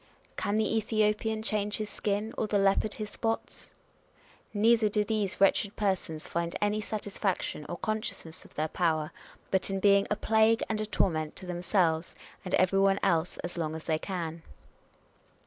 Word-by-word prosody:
" - - -29
Can 205 - -1
the 220 +1 +1
Ethiopian 215 0 +1
change 210 -1 0
his 215 -1 -4
skin, 210 +2 -2
or 220 - -1
the 210 - +1
leopard 195 +2 +2
his 210 -1 -5
spots 225 0 -3 0.4
?" - - -30
Neither 220 +1 +4
do 210 0 +1
these 210 -2 -1
wretched 195 +1 +3
persons 185 -6 -1
find 170 0 -2
any 210 +1 +1
satisfaction 200 -7 -2
or 175 - -4
conscious 215 -2 -3
ness 160 0 -9
of - - -19
their 155 +1 0
power, 155 -2 0 0.4
but 190 0 +2
in 195 0 -1
being 200 0 +4
a 210 - +1
plague 220 +1 +3
and 215 -1 -1
a 215 - -3
torment 155 -6 0
to 190 - -7
themselves 175 -2 0 0.3
and 185 - 0
every 185 +1 +3
one 195 0 +4
else 170 -1 +1
as 175 0 -4
long 160 -1 -2
as 160 - -7
they 160 -1 +1
can. 170 -3 -4
200 Hz, 180 wpm, -29 LUFS, 175-215 Hz, 0.4 s, Neither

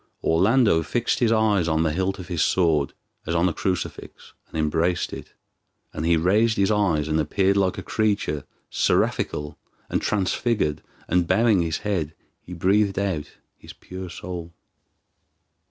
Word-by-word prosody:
Orlando 100 +2 +3
fixed 120 +9 -1
his 120 -3 +3
eyes 105 -6 +2
on 80 0 +2
the 80 -2 0
hilt 95 +3 -1
of 90 - -9
his 85 -4 -2
sword 80 -6 +2 0.3
as 85 - -1
on 85 +2 +3
a 85 - -1
crucifix, 90 +2 -4
and - - -7
embraced 80 +3 0
it, - - -9 0.6
and 80 - -3
he 85 -1 +4
raised 105 +7 +2
his 100 +1 +2
eyes 90 -8 +1
and 80 0 +1
appeared 95 +6 +1
like 95 -2 +1
a - - -5
creature 100 -9 -1 0.3
seraphical 75 0 0 0.3
and - - 0
transfigured, 100 -5 0 0.3
and 85 0 +1
bowing 105 0 +3
his 80 -1 -1
head, 85 -7 -1 0.3
he - - -14
breathed 95 +3 +2
out 95 -7 -2 0.3
his - - -12
pure 95 0 -9
soul. 85 -1 -7
90 Hz, 155 wpm, -24 LUFS, 80-100 Hz, 0.6 s, he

